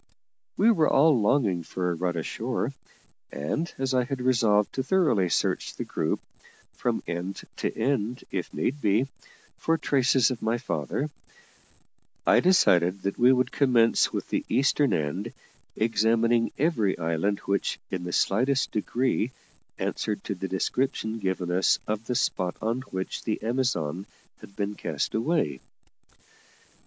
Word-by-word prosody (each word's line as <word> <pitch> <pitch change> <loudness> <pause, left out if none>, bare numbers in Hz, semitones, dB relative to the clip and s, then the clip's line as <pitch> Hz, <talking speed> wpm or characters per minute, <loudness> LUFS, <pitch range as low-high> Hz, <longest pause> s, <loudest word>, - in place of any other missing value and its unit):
We 225 +3 +5
were 160 -8 +3
all 145 -4 +4
longing 105 -6 +2
for 90 +2 -2
a - - 0
run 85 0 -2
ashore; 80 - -2 0.6
and, 150 - -2
as 135 0 -1
I 125 -1 +3
had 135 +1 -4
resolved 115 -5 +2
to 130 - -1
thoroughly 130 - +2
search - - 0
the - - -4
group, - - -1 0.5
from - - -2
end 90 +3 -4
to - - -1
end 120 -1 -1
if - - -3
need 140 +3 -2
be, 105 +5 +3 0.5
for 165 0 +1
traces 135 -4 +3
of 125 - -5
my 115 +2 +1
father, 135 +4 -3 1.1
I - - +5
decided 95 - +3
that 100 - -2
we 125 +2 +6
would 130 -1 +2
commence 120 -5 +3
with - - -4
the - - -1
eastern 140 +1 +2
end, 90 +9 -2 0.4
examining 115 +1 +2
every 130 - +1
island 85 +4 0
which 100 0 -1
in 90 -1 -3
the 90 - -4
slightest 130 +10 +1
degree 120 +2 0 0.5
answered 105 -2 -2
to - - -3
the 95 0 -5
description 110 +3 -1
given 95 -3 -2
us 90 +2 +3
of 110 +1 -3
the 125 - -1
spot 90 -7 0
on 115 +3 -1
which 95 0 -4
the 110 - -1
Amazon 100 - -1 0.3
had 100 - -14
been 100 0 -2
cast - - -3
away. 115 - 0
110 Hz, 145 wpm, -27 LUFS, 95-130 Hz, 1.1 s, we